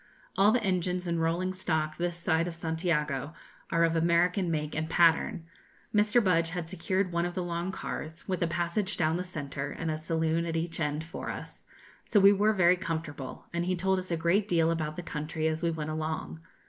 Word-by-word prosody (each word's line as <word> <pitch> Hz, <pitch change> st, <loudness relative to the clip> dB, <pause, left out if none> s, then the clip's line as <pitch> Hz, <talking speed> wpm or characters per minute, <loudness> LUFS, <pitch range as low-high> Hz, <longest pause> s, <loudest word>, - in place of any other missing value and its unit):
All 200 Hz, +2 st, +5 dB
the 240 Hz, -1 st, +1 dB
engines 180 Hz, -1 st, 0 dB
and 170 Hz, -1 st, 0 dB
rolling 175 Hz, +3 st, 0 dB
stock 155 Hz, -4 st, -1 dB
this 175 Hz, 0 st, -1 dB
side 170 Hz, -1 st, +1 dB
of 170 Hz, -, -5 dB
Santiago 160 Hz, -4 st, -1 dB, 0.4 s
are 170 Hz, 0 st, +3 dB
of 165 Hz, 0 st, +2 dB
American 170 Hz, +2 st, +2 dB
make 150 Hz, -2 st, -2 dB
and 160 Hz, +1 st, -2 dB
pattern. 165 Hz, -1 st, +3 dB, 0.5 s
Mr. 210 Hz, +3 st, +4 dB
Budge 170 Hz, -3 st, +3 dB
had 170 Hz, -1 st, -4 dB
secured 185 Hz, +1 st, -1 dB
one 170 Hz, 0 st, +1 dB
of 175 Hz, 0 st, -3 dB
the 185 Hz, -, -1 dB
long 175 Hz, +1 st, -2 dB
cars, 160 Hz, -4 st, -6 dB
with 185 Hz, -2 st, -2 dB
a 170 Hz, -, +3 dB
passage 175 Hz, +5 st, -1 dB
down 160 Hz, 0 st, +2 dB
the 180 Hz, -, -2 dB
centre, 145 Hz, -5 st, -5 dB
and 165 Hz, -1 st, -3 dB
a 155 Hz, -, -3 dB
saloon 160 Hz, +1 st, 0 dB
at 165 Hz, 0 st, -1 dB
each 165 Hz, +1 st, -3 dB
end, 150 Hz, 0 st, -1 dB
for 165 Hz, -, -6 dB
us, -, -, -8 dB, 0.4 s
so 210 Hz, -, +3 dB
we 200 Hz, +1 st, +8 dB
were 205 Hz, +2 st, +3 dB
very 180 Hz, -2 st, +4 dB
comfortable, 160 Hz, -6 st, -5 dB
and 170 Hz, 0 st, -1 dB
he 185 Hz, 0 st, +1 dB
told 190 Hz, +1 st, +1 dB
us 185 Hz, -, -7 dB
a 170 Hz, -, 0 dB
great 180 Hz, +5 st, +2 dB
deal 165 Hz, -3 st, +3 dB
about 155 Hz, -2 st, -2 dB
the 175 Hz, -, -6 dB
country 155 Hz, 0 st, -2 dB
as 160 Hz, 0 st, -1 dB
we 170 Hz, -, +1 dB
went 155 Hz, -2 st, -3 dB
along. 155 Hz, +1 st, -3 dB
170 Hz, 210 wpm, -29 LUFS, 160-180 Hz, 0.5 s, we